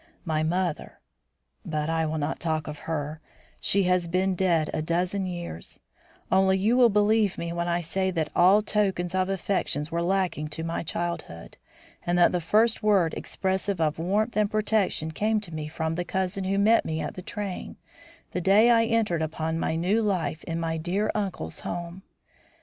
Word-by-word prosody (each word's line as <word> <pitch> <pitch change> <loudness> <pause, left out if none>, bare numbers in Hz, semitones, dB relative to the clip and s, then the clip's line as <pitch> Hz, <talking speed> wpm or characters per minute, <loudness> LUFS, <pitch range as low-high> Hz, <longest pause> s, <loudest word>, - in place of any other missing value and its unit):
My 155 -2 0
mother 175 +1 -2 0.6
but 155 -2 -2
I 160 0 0
will 155 +1 -2
not 150 +1 -2
talk 155 -3 -1
of 150 0 -6
her; 150 0 -3 0.4
she 200 0 +2
has 180 -1 +2
been 185 +3 +1
dead 170 -4 +1
a - - -1
dozen 180 +4 -1
years 175 - -7 0.5
only 190 0 +4
you 215 +5 +2
will 250 -2 +6
believe 210 -1 +2
me 170 0 -4
when 170 0 -2
I 175 0 0
say 190 +3 -1
that 160 -4 -2
all 190 +4 +5
tokens 190 -4 0
of 185 0 +1
affection 190 -5 -1
were 170 +1 0
lacking 180 -4 0
to 155 +2 -5
my 165 0 -2
childhood 170 - -5 0.5
and 175 0 0
that 175 - +5
the 180 - -1
first 220 +7 +3
word 195 -6 +3
expressive 190 0 -2
of 155 -1 0
warmth 210 +7 0
and 210 -1 +2
protection 210 -7 0
came 215 +6 +1
to 185 -6 -8
me 155 -1 -4
from 160 +1 -2
the 175 +2 -2
cousin 190 +1 -2
who 195 +1 0
met 215 +3 +4
me 160 0 -3
at - - -4
the 185 - -7
train 205 -1 -5 0.6
the 180 - -2
day 205 +6 +5
I 230 -1 +5
entered 225 -8 +1
upon 160 +1 -2
my 160 - -1
new 185 +7 +1
life 185 -6 -1
in 165 -1 -3
my 165 -1 -1
dear 185 +6 -1
uncle's 190 - -3
home. 175 +1 -5
180 Hz, 185 wpm, -26 LUFS, 160-200 Hz, 0.6 s, will